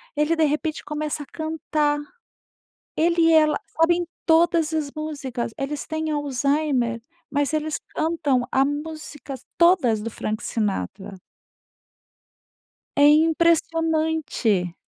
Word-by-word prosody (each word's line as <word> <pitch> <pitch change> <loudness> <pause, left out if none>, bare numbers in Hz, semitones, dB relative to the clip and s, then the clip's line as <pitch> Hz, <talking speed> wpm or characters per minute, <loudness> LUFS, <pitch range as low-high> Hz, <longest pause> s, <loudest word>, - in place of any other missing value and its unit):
ele 300 +3 +2
de 320 - +2
repente 305 +1 -2
começa 300 0 -3
a - - -13
cantar. 310 -2 -1 1.0
Ele 335 +1 +2
e 330 0 +5
ela 310 -1 +4 0.2
sabem 345 +2 +3 0.2
todas 330 -1 +3
as 305 -3 -1
músicas. 280 -7 -4
Eles 280 +2 -4
têm 315 0 -2
Alzheimer, 275 -4 0 0.3
mas 290 0 0
eles 310 0 -1 0.2
cantam 305 -6 +1
a 270 - +4
músicas 295 -2 -6 0.2
todas 320 - +4
do 230 - -4
Frank 215 +1 -4
Sinatra. 195 -3 -3 1.8
É 285 - +6
impressionante! 320 - +2
300 Hz, 110 wpm, -23 LUFS, 275-320 Hz, 1.8 s, É